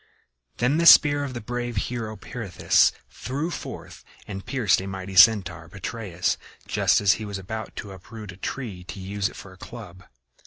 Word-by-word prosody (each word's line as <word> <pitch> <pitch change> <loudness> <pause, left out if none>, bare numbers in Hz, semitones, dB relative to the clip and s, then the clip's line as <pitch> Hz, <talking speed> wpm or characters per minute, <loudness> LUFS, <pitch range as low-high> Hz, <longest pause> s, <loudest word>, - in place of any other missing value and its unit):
Then 125 +5 +2
the 170 0 +4
spear 145 -2 +8
of 135 -3 -5
the 120 - -4
brave 120 +1 -4
hero 110 0 -3
Pirithous 105 -9 +2 0.2
flew 145 +7 -4
forth - - -8 0.2
and 100 -2 -7
pierced 115 -5 +2
a 95 - -6
mighty 95 0 -6
Centaur, 100 -5 +5
Petraeus, 100 -2 -3 0.3
just - - +3
as 100 -1 +5
he - - -3
was 100 -2 -5
about 110 +4 -6
to 100 - -7
uproot 105 +2 -10
a 90 - -14
tree 100 -3 -5
to 95 - -8
use 100 +1 -2
it - - -15
for 100 - -11
a - - -17
club. 95 -4 -11
105 Hz, 180 wpm, -25 LUFS, 95-120 Hz, 0.3 s, spear